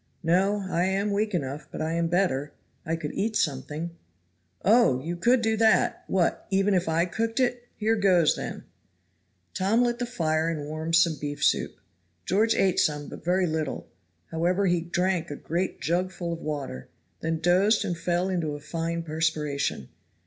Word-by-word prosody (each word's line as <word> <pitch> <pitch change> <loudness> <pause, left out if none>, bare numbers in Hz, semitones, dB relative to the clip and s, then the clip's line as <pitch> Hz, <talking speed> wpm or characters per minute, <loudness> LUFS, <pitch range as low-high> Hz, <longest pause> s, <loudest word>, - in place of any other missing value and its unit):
"No, 195 +4 +2
I 175 -1 +1
am 195 +2 0
weak 210 0 0
enough, 140 -2 -4
but - - -6
I 155 +1 -1
am 170 0 +1
better 165 -5 0 0.3
I 165 - +1
could 155 -2 -5
eat 220 +2 -1
something." 150 +3 -1 0.7
"Oh, 215 - +5
you 165 +6 -4
could 235 +7 +3
do 220 0 +2
that! 220 0 +3
what! 180 -3 0
even 195 +1 +2
if 180 -3 +1
I 165 +2 +2
cooked 225 +7 -2
it? 245 -1 0
Here 220 +1 +1
goes, 185 -6 +4
then." - - -6 0.9
Tom 210 +6 +2
lit 240 0 0
the 245 - -2
fire 160 -8 0
and 160 -3 -3
warmed 155 +2 -2
some 165 -3 +3
beef 145 0 -4
soup. - - +1 0.5
George 220 +4 +2
ate 190 -2 +2
some, 150 -1 0
but - - -10
very 180 +2 +2
little; 155 -3 -2 0.5
however 180 +4 +1
he 175 -2 +2
drank 175 +1 -1
a 145 - -4
great 175 +5 -3
jugful 175 +2 -1
of 165 - -6
water 140 - -5 0.3
then 165 0 -1
dozed 185 +6 +3
and 175 - -1
fell 175 +2 0
into 170 -6 -1
a - - -7
fine 165 +2 -3
perspiration. 155 - -1
175 Hz, 170 wpm, -26 LUFS, 160-195 Hz, 0.9 s, Oh